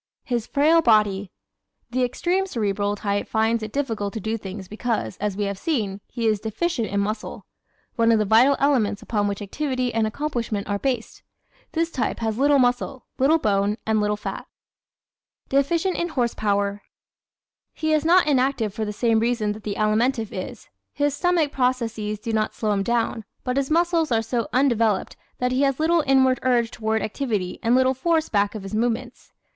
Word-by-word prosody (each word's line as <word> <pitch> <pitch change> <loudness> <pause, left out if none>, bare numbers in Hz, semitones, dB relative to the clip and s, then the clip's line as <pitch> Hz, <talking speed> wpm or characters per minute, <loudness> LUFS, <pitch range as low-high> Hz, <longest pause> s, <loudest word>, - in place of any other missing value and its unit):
His 240 -3 -2
Frail 315 +4 +4
Body 205 - +2 0.6
¶ - - -40
The 255 0 +1
extreme 360 +10 0
Cerebral 205 - -1
type 205 -1 -2
finds 225 +1 +1
it 215 0 -5
difficult 225 -7 -2
to - - -2
do 220 +2 -2
things 195 -2 -7
because, 215 - -2
as 205 -1 -2
we 205 - 0
have 200 -1 -3
seen, 210 -11 -2
he 235 -2 -4
is 215 -2 +2
deficient 230 - -2
in 200 - -1
muscle 215 +2 -3 0.5
one 230 0 +4
of 225 - +4
the 215 - +1
vital 235 +7 +5
elements 255 -8 +1
upon 205 -2 0
which 200 +1 -3
activity 255 +2 -2
and 225 -1 +1
accomplishment 230 -5 -3
are 200 0 -1
based. 250 -3 -3 0.5
This 330 0 0
type 255 - -1
has 225 0 -2
little 285 +1 +4
muscle, 250 +1 0
little 285 +5 +4
bone, 205 -5 +1
and 220 -1 +2
little 210 0 0
fat. - - -6 1.0
Deficient 325 +7 +1
in 345 - -1
"Horse 245 -7 0
Power" 205 -1 0
¶ - - -40 0.8
He 315 0 -1
is 305 -1 +2
not 350 +2 +5
inactive 260 -7 +1
for 220 - -3
the 210 - -3
same 225 +1 +2
reason 230 -2 0
that 215 +1 -7
the 205 -2 -3
Alimentive 220 +2 +1
is; 185 - -7 0.3
his 290 -1 0
stomach 340 -3 +1
processes 235 -5 -1
do 225 +2 -5
not 215 -1 0
slow 215 -2 -1
him 200 -1 +1
down. 230 +1 0 0.2
But 250 - -2
his 275 -1 0
muscles 335 -2 +2
are 225 -1 +2
so 230 +1 -2
undeveloped 230 -6 +1 0.2
that 250 0 0
he 255 +2 +1
has 275 -1 +1
little 325 +1 +3
inward 260 -1 +4
urge 240 -3 +2
toward 220 -1 -1
activity 215 -5 -2
and 235 +2 +3
little 260 0 +4
force 320 +4 0
back 205 0 +1
of 210 - -6
his 195 - -8
movements. 240 +2 -2
230 Hz, 185 wpm, -23 LUFS, 210-270 Hz, 1.0 s, vital